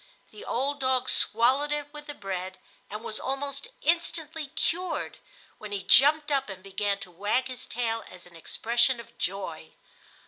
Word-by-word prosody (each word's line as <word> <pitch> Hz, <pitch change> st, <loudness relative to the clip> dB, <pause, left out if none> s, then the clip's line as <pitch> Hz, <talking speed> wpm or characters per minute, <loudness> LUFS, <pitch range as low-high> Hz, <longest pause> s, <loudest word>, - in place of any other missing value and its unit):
The 425 Hz, -, -10 dB
old 285 Hz, -, 0 dB
dog 260 Hz, -1 st, +2 dB
swallowed 260 Hz, +6 st, +4 dB
it 295 Hz, 0 st, -2 dB
with 295 Hz, 0 st, -9 dB
the 290 Hz, -, -6 dB
bread 190 Hz, -1 st, -4 dB, 0.3 s
and 210 Hz, +2 st, -6 dB
was 220 Hz, -, -4 dB
almost 275 Hz, +1 st, -3 dB, 0.2 s
instantly 325 Hz, -1 st, 0 dB
cured, 355 Hz, +6 st, -1 dB, 0.4 s
when 210 Hz, -1 st, -7 dB
he 200 Hz, -2 st, -2 dB
jumped 295 Hz, +8 st, +6 dB
up 270 Hz, -4 st, +2 dB
and 190 Hz, -1 st, -7 dB
began 200 Hz, +1 st, 0 dB
to 180 Hz, -, -8 dB
wag 205 Hz, +8 st, +1 dB
his 255 Hz, -2 st, -7 dB
tail 230 Hz, -1 st, -1 dB
as 180 Hz, -1 st, -11 dB
an 175 Hz, -1 st, -16 dB
expression 235 Hz, +8 st, +2 dB
of 235 Hz, -, -12 dB
joy. 180 Hz, -4 st, -3 dB
245 Hz, 165 wpm, -28 LUFS, 200-290 Hz, 0.4 s, jumped